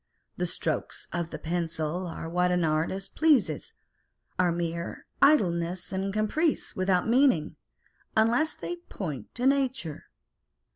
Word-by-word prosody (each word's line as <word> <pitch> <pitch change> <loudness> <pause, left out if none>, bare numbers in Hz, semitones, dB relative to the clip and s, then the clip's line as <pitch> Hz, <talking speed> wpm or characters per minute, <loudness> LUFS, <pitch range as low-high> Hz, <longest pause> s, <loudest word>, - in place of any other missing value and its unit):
The - - -1
strokes - - -3
of 170 -1 -2
the - - -6
pencil 165 +1 -2
are 165 - -6
what 180 +2 +2
the 180 -1 +2
artist 160 +5 -1
pleases, 255 - +2 0.7
are 180 -1 +4
mere 170 0 -3 0.2
idleness 180 - +3
and 190 +1 -1
caprice 215 - 0
without 185 0 +2
meaning, 240 - +3 0.6
unless 235 +8 +3
they 350 - -5
point 160 - -7
to 245 - -2
nature. 260 - 0
180 Hz, 125 wpm, -28 LUFS, 170-240 Hz, 0.7 s, are